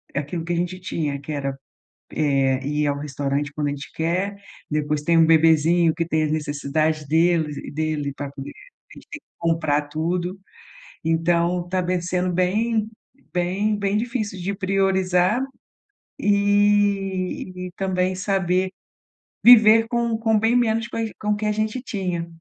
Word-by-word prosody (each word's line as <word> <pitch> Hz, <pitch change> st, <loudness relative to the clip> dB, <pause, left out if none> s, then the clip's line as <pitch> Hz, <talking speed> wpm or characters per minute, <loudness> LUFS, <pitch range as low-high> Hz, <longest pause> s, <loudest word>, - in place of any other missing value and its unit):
aquilo 150 Hz, +4 st, -3 dB
que 175 Hz, -, -2 dB
a -, -, 0 dB
gente 180 Hz, +2 st, -2 dB
tinha 150 Hz, -6 st, -3 dB
que 155 Hz, -, -7 dB
era, 140 Hz, -1 st, -2 dB, 0.6 s
eh, 135 Hz, -3 st, +1 dB
ir 150 Hz, 0 st, 0 dB
ao 140 Hz, 0 st, -1 dB
restaurante 145 Hz, 0 st, -2 dB
quando 150 Hz, -1 st, -2 dB
a -, -, 0 dB
gente 145 Hz, 0 st, -7 dB
quer, 185 Hz, +5 st, -1 dB, 0.3 s
depois 150 Hz, 0 st, -1 dB
tem 165 Hz, +2 st, +2 dB
um 165 Hz, -, +6 dB
bebezinho 165 Hz, +1 st, +4 dB
que 165 Hz, -1 st, -1 dB
tem 160 Hz, -2 st, +1 dB
a -, -, +1 dB
necessidade 150 Hz, 0 st, -1 dB
deles 160 Hz, -1 st, +2 dB
e -, -, -7 dB
dele 150 Hz, -2 st, -2 dB
pra 140 Hz, -1 st, -5 dB
comer, 140 Hz, 0 st, -8 dB, 0.4 s
a -, -, -12 dB
gente -, -, -15 dB
tem 295 Hz, -, -6 dB
que -, -, -76 dB
comprar 155 Hz, -3 st, +1 dB
tudo, 175 Hz, +4 st, -2 dB, 0.7 s
então 170 Hz, +2 st, +1 dB
tá 185 Hz, 0 st, 0 dB
bem 180 Hz, 0 st, -1 dB
sendo 180 Hz, +1 st, -1 dB
bem 215 Hz, +5 st, +1 dB, 0.5 s
bem 195 Hz, +4 st, 0 dB
bem 200 Hz, 0 st, 0 dB
difícil 220 Hz, -5 st, -3 dB
de 195 Hz, +3 st, -2 dB
priorizar, 190 Hz, +2 st, +1 dB, 0.8 s
eh, -, -, -4 dB
e 200 Hz, -3 st, +1 dB
também 185 Hz, -1 st, 0 dB
saber 185 Hz, -1 st, 0 dB, 0.7 s
viver 225 Hz, -1 st, +8 dB
com 235 Hz, -1 st, 0 dB
com 220 Hz, -1 st, +2 dB
bem 225 Hz, +3 st, +2 dB
menos 230 Hz, -1 st, +1 dB
com -, -, -7 dB
as 225 Hz, -1 st, -1 dB
com 210 Hz, -, -3 dB
o 210 Hz, -, +3 dB
que 215 Hz, +1 st, -4 dB
a 210 Hz, -, +2 dB
gente 215 Hz, +3 st, -1 dB
tinha, 180 Hz, -7 st, -3 dB
180 Hz, 165 wpm, -22 LUFS, 155-200 Hz, 0.8 s, viver